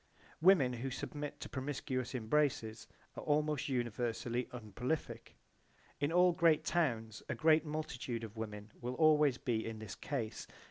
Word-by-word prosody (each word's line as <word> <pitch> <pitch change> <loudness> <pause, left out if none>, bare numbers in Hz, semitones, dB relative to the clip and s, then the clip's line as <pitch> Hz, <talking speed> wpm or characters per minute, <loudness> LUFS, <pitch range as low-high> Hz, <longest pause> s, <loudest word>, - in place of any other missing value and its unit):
Women 160 -8 +6
who 125 +3 -3
submit 145 +3 -5
to - - -4
promiscuous 130 -1 -3
embraces 115 -2 0 0.3
are - - -5
almost 150 -2 +1
universally 120 -1 -1
unprolific. 125 +6 -4 0.6
In 145 +2 +1
all 180 +1 +6
great 165 -3 +4
towns 115 -11 0
a - - -1
great 155 0 +4
multitude 145 -6 -3
of 110 -1 -7
women 105 -1 -6
will 125 +1 -3
always 150 -3 +5
be 115 -3 -1
in 115 -1 -5
this 110 -2 -7
case. 120 -5 -4
130 Hz, 140 wpm, -35 LUFS, 115-150 Hz, 0.6 s, Women